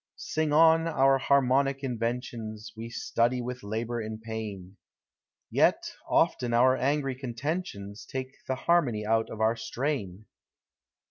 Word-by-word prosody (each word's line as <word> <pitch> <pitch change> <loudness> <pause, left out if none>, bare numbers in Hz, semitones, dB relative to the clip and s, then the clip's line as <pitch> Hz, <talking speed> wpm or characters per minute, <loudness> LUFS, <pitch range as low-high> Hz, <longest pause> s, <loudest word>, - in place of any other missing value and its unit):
Sing 155 -1 -2
on.— 165 +2 +5
our 135 -4 +3
harmonic 135 +1 +2
inventions 115 -3 -4
We 115 +1 -7
study 120 +1 0
with 125 +1 -5
labor 115 +3 -3
and 110 0 -5
pain; 105 -4 -6 0.7
Yet - - +2 0.2
often 120 -2 +2
our 130 +2 +5
angry 135 +1 0
contentions 125 - -5
Take 130 0 -4 0.2
the 130 - 0
harmony 130 -9 +1
out 115 +1 +1
of 110 - -7
our 110 +1 +3
strain. 115 -4 -3
120 Hz, 125 wpm, -28 LUFS, 110-135 Hz, 0.7 s, on